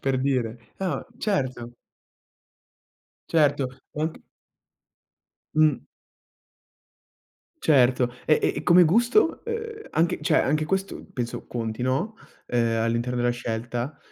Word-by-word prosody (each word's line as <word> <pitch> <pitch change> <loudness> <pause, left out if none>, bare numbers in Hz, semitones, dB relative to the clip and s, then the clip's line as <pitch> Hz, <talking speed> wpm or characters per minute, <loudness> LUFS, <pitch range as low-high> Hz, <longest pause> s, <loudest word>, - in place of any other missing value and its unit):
per 135 -1 0
dire. 120 -4 -2
Ah, 180 -8 -2
certo. 130 - -2 1.5
Certo, 145 -4 +3 0.3
anc 160 +1 -1 1.4
Mh. 155 -1 +3 1.8
Certo. 125 -4 +4
E 155 - +5
e - - +2
e - - -3
come 175 0 +7
gusto? 240 - +3
Ehm, 455 -1 -5
anche 170 +2 +1
cioè 160 - +2
anche 155 +2 +1
questo 195 +2 -2
penso 120 -3 -4
conti, 115 -1 -4
no, 135 - -1 0.3
ehm, 115 -2 +1
all'interno 115 +2 0
della 120 0 +2
scelta? 120 +3 -4
135 Hz, 105 wpm, -25 LUFS, 120-170 Hz, 1.8 s, come